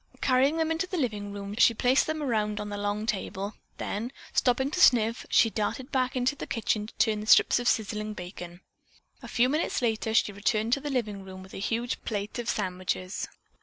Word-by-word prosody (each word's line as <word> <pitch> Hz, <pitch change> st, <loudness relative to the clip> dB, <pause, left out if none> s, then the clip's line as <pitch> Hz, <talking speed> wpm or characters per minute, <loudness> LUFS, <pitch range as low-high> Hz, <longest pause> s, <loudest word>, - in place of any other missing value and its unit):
Carrying 270 Hz, +4 st, +3 dB
them 320 Hz, 0 st, +1 dB
into 325 Hz, +3 st, -1 dB
the 365 Hz, -, -3 dB
living 210 Hz, -8 st, -2 dB
room, 200 Hz, 0 st, -6 dB
she 230 Hz, -2 st, +6 dB
placed 250 Hz, +4 st, +3 dB
them 310 Hz, -1 st, -2 dB
around 210 Hz, -5 st, 0 dB
on 210 Hz, 0 st, -4 dB
the 205 Hz, -, -4 dB
long 205 Hz, +1 st, -2 dB
table, 205 Hz, -2 st, -3 dB, 0.2 s
then, 225 Hz, +5 st, -3 dB, 0.2 s
stopping 265 Hz, +2 st, +2 dB
to 360 Hz, -, -2 dB
sniff, 230 Hz, -4 st, +4 dB
she 225 Hz, -, +4 dB
darted 250 Hz, +6 st, -3 dB
back 255 Hz, -1 st, 0 dB
into 255 Hz, +2 st, +1 dB
the -, -, -7 dB
kitchen 215 Hz, -2 st, -1 dB
to -, -, -13 dB
turn 220 Hz, -2 st, +2 dB
the 210 Hz, -, -7 dB
strips -, -, +6 dB
of 245 Hz, -, -2 dB
sizzling 215 Hz, -1 st, 0 dB
bacon. 175 Hz, -1 st, -8 dB, 0.6 s
A -, -, -9 dB
few 245 Hz, +1 st, +3 dB
minutes 305 Hz, +5 st, 0 dB
later 220 Hz, -2 st, 0 dB
she 210 Hz, -, +3 dB
returned 215 Hz, +3 st, 0 dB
to 275 Hz, -, +2 dB
the 295 Hz, -, -4 dB
living 215 Hz, -7 st, -2 dB
room 185 Hz, 0 st, -10 dB
with 190 Hz, -, -14 dB
a -, -, -6 dB
huge 230 Hz, +4 st, -2 dB
plate 210 Hz, +1 st, -3 dB
of 235 Hz, -, -3 dB
sandwiches. 185 Hz, -1 st, -2 dB
220 Hz, 205 wpm, -28 LUFS, 205-255 Hz, 0.6 s, she